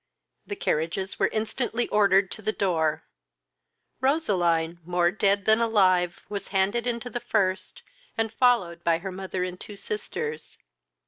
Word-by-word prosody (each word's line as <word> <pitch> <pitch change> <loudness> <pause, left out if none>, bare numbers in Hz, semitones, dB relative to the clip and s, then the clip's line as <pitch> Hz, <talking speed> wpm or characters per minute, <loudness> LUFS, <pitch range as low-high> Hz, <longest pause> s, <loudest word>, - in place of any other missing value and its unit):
The 405 - -4
carriages 180 - -2
were - - +4
instantly 225 +2 -2
order 200 -2 +4
to 195 +3 -7
the 215 0 0
door. 160 -7 0 1.0
Roseline, 175 - +1
more 175 0 +1
dead 200 -1 +1
than 220 +1 +4
alive, 185 -6 +2
was 205 -1 -5
handed 200 +5 0
into 240 0 -3
the 240 - -3
first, 200 -5 -1 0.3
and 225 -1 -1
followed 190 -10 +2
by 165 -1 +3
her 190 +3 -6
mother 190 0 -4
and 180 0 -5
two 210 - -8
sisters. 195 -6 -4
195 Hz, 140 wpm, -26 LUFS, 175-220 Hz, 1.0 s, were